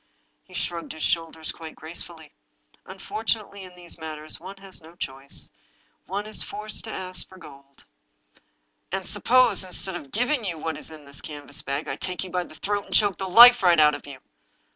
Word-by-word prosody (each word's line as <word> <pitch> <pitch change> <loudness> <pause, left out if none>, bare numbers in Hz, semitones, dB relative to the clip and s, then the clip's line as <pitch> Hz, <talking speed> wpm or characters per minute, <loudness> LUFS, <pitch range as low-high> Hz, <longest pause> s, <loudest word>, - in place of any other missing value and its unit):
He 185 - -16
shrugged 170 -1 -3
his 160 - -6
shoulders 160 -1 -1
quite 160 -1 -10
gracefully. 160 -1 -6 0.3
" - - -34
Unfortunately, 200 +1 -3
in 180 -1 -12
these 175 -1 -4
matters 155 -1 -4
one 190 +3 -9
has 195 -2 -5
no 160 +2 -15
choice— 135 -3 -3 0.6
one 200 +2 -3
is 215 - +1
forced 215 +1 -3
to 220 - -6
ask 185 -1 -3
for 185 - -14
gold." 140 -5 -15 0.6
" - - -46
And 190 0 -2
suppose, 240 -2 +5
instead 185 +1 -3
of 145 -5 -7
giving 245 - +1
you 175 -5 -3
what 160 0 -3
is - - -7
in 155 -2 -11
this 140 0 -5
canvas 145 -2 -6
bag, 140 +3 -3
I - - -3
take 185 0 -3
you 185 - -8
by 180 0 -1
the 155 - -14
throat 205 +2 -2
and - - -2
choke 205 -3 +4
the 190 -1 -3
life 240 +5 +10
right 175 -3 +5
out 150 -1 +7
of 145 - -7
you 140 -2 -8
175 Hz, 200 wpm, -25 LUFS, 155-195 Hz, 0.6 s, life